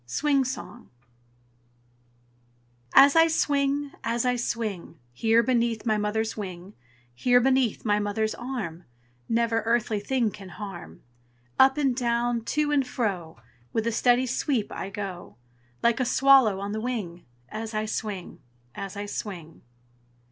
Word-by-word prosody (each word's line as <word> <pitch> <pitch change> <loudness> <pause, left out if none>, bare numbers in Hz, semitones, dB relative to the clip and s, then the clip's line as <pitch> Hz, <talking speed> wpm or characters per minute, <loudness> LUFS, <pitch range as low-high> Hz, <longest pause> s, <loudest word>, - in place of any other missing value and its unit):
SWING 280 - +1
SONG 255 -1 -7 2.1
As 280 +2 +8
I 325 0 +7
swing, 285 -2 0
as 235 +1 -1
I 250 0 +2
swing, 220 -8 -3 0.2
Here 225 - +3
beneath 235 -3 0
my 220 -2 +2
mother's 220 +2 -1
wing, 185 -2 -7 0.4
Here 245 - +3
beneath 260 -3 +1
my 210 -1 +2
mother's 210 +1 -1
arm, 225 -10 -5 0.4
Never 230 0 +1
earthly 225 -1 0
thing 235 +1 0
can 195 -1 -11
harm. 175 - -9 0.6
Up 265 +2 +6
and 270 -4 +1
down, 235 -1 0
to 300 +2 0
and 275 -3 +2
fro, 195 -10 -3 0.4
With 225 -1 0
a 235 - +1
steady 245 +2 +3
sweep 255 -2 -1
I 195 - -5
go, 195 -3 -7 0.5
Like 235 +1 +3
a 255 - +1
swallow 265 -6 +5
on 200 +1 -4
the 215 +1 -3
wing, 205 -8 -4 0.3
As 220 0 -6
I 215 0 0
swing, 210 -4 -5 0.3
as 195 +4 -7
I 205 - -4
swing. 180 -6 -7
225 Hz, 140 wpm, -26 LUFS, 205-255 Hz, 2.1 s, As